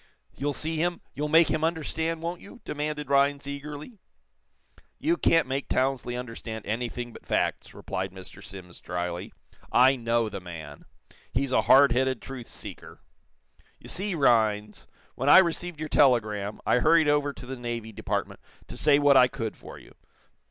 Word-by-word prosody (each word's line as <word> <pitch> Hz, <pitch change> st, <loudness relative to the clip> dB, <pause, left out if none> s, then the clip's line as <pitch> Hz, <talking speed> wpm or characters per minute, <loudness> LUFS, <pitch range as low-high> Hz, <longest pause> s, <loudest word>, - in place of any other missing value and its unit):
"You'll 145 Hz, +2 st, -2 dB
see 160 Hz, +2 st, -2 dB
him 175 Hz, +2 st, -1 dB
you'll 150 Hz, +3 st, -3 dB
make 165 Hz, +2 st, +5 dB
him 155 Hz, 0 st, -1 dB
understand, 160 Hz, 0 st, -2 dB
won't 170 Hz, +1 st, -4 dB
you?" 240 Hz, +5 st, -13 dB
demanded 150 Hz, -1 st, -4 dB
Rhinds, 140 Hz, 0 st, +3 dB
eagerly. 145 Hz, -, -7 dB, 1.0 s
"You 330 Hz, +3 st, +1 dB
can't 165 Hz, -, +3 dB
make 135 Hz, +1 st, -3 dB
Townsley 130 Hz, -2 st, 0 dB
understand 115 Hz, -2 st, -6 dB
anything 120 Hz, +2 st, -4 dB
but -, -, -13 dB
facts," -, -, -1 dB
replied 95 Hz, 0 st, -4 dB
Mr. 95 Hz, 0 st, -11 dB
Simms, 90 Hz, -3 st, -11 dB
dryly. 90 Hz, 0 st, -4 dB, 0.4 s
"I 130 Hz, +2 st, +5 dB
know 115 Hz, -2 st, 0 dB
the 100 Hz, -, -6 dB
man. 80 Hz, -5 st, -10 dB, 0.5 s
He's 135 Hz, +1 st, -1 dB
a -, -, +4 dB
hard 140 Hz, -1 st, +6 dB
headed 130 Hz, 0 st, +1 dB
truth 130 Hz, -1 st, -9 dB
seeker. -, -, -11 dB, 0.8 s
You -, -, -12 dB
see, 195 Hz, 0 st, -2 dB
Rhinds, 110 Hz, -7 st, +1 dB, 0.3 s
when 135 Hz, +3 st, -1 dB
I -, -, +10 dB
received 175 Hz, -2 st, +2 dB
your 155 Hz, -, -3 dB
telegram, 110 Hz, -8 st, +2 dB
I 125 Hz, -, +3 dB
hurried 160 Hz, +3 st, +4 dB
over 145 Hz, -1 st, +2 dB
to 125 Hz, -, -11 dB
the 130 Hz, +1 st, -6 dB
Navy 120 Hz, -2 st, -5 dB
Department 105 Hz, -, -3 dB, 0.3 s
to -, -, -8 dB
say 150 Hz, -2 st, +4 dB
what 145 Hz, -1 st, +5 dB
I 125 Hz, -1 st, +7 dB
could 120 Hz, -5 st, -5 dB
for -, -, -11 dB
you. -, -, -16 dB
135 Hz, 165 wpm, -27 LUFS, 115-150 Hz, 1.0 s, I